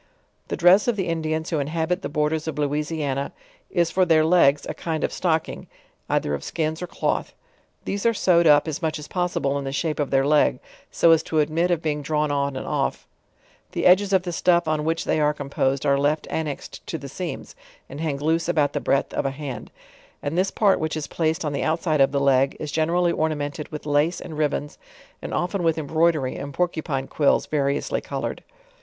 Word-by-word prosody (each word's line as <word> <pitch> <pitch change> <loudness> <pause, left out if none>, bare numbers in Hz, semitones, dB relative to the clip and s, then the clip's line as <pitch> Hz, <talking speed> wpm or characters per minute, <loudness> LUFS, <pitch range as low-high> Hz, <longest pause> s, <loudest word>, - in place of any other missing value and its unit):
The - - -3
dress 180 +5 +5
of 240 - +2
the 190 -3 -2
Indians 160 0 -2
who 160 - +1
inhabit 160 +5 -1
the - - -4
borders 155 +1 -1
of 160 - -4
Lou 145 -1 +1
isiana 150 -2 -2 0.4
is 170 -1 +1
for 185 - +3
their 160 -3 +4
legs, 155 -4 +4
a - - -3
kind 160 -2 -3
of - - -1
stocking, 160 -3 -1 0.4
cither 75 - 0
of 70 -1 -3
skins 160 0 -2
or 180 - -4
cloth; - - -2 0.5
these 200 0 -3
are - - +5
sewed 170 -4 +4
up 145 +1 +5
as 155 0 -3
much 160 -1 -1
as 150 - -9
possible 175 -6 -1
in - - -5
the 135 - -3
shrpe 155 +3 -2
of 145 - 0
their 135 0 +2
leg, 145 -3 +3 0.3
so 170 - +4
as 165 -1 +5
to 160 - -3
admit 160 +3 +2
of 170 -2 0
being 150 -2 -1
drawn 150 0 0
on 140 -1 -1
and 130 - -5
off; - - -2 0.7
the - - -2
edges 190 +2 +5
of 190 -2 +3
tne 180 - -4
stuff 175 0 +2
on 155 -1 0
which 165 +1 0
they - - +1
are 150 0 +2
composed 140 -1 -1
are 140 -1 +3
left 150 +2 +1
an 160 -1 -1
nexed 145 - -7
to 160 - -3
the 140 -2 -8
seams, 180 +6 -6 0.3
and 145 - -8
hang 155 -4 -1
loose 160 +3 0
about 150 -4 +2
the - - -2
breadth 135 - 0
of - - 0
a - - +1
hand; 135 -2 -7 0.5
and 145 +3 -2
this 185 +2 +2
part 200 -2 +2
which 155 0 -2
is 155 - -3
placed 160 +1 -1
on 150 - -2
the 140 - -2
outside 160 -2 +1
of 135 - +4
the 140 - 0
leg, 135 0 +2
is 150 - -5
generally 170 +3 +1
ornamented 150 -2 -2
with 150 -1 -7
lace 150 +3 +1
and 160 -4 -7
ribbons, 150 -1 -2 0.4
find - - -6
often 180 +2 -1
with 165 -2 +1
embroidery 155 -2 +1
and 140 -1 -7
porcupine 160 -6 -1
quills 145 - +2
variously 140 -2 -1
colored. - - -5
155 Hz, 215 wpm, -23 LUFS, 145-170 Hz, 0.7 s, dress